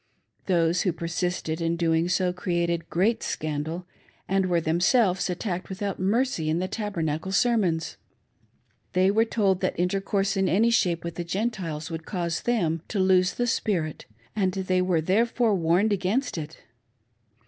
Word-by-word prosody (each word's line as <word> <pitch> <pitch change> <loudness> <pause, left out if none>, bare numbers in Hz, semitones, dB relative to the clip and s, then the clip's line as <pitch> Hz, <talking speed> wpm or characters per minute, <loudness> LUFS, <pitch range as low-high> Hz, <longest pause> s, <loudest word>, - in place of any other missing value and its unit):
Those 170 -2 +2
who 185 - +1
persisted 170 0 -3
in 165 0 0
doing 165 0 +1
so 180 -1 +1
created 170 -2 -1
great 220 +6 +1
scandal, 155 +3 -3 0.4
and 195 0 +1
were 175 -1 +2
themselves 185 - +2
attacked 180 0 -3
without 195 0 -4
mercy 200 -3 +1
in 160 - +1
the 185 +2 -1
Tabernacle 185 -5 -3
sermons. 195 -7 +1 1.0
They 185 +1 +4
were 220 +2 +3
told 200 -5 +1
that 185 - -1
intercourse 195 +2 0
in 195 -1 +1
any 225 +5 +3
shape 175 -7 +1
with 170 -1 -6
the 175 - -2
Gentiles 175 -5 -3
would 160 -1 -6
cause 175 -3 -2
them 170 -10 0
to 215 - -4
lose 185 -1 +3
the 245 - 0
spirit, 180 -9 -1 0.3
and 190 -3 +1
they 185 -1 0
were, 180 -3 +1
therefore, 225 +5 +2
warned 185 +4 +2
against 205 +8 -1
it. 160 -2 -6
180 Hz, 150 wpm, -26 LUFS, 170-200 Hz, 1.0 s, They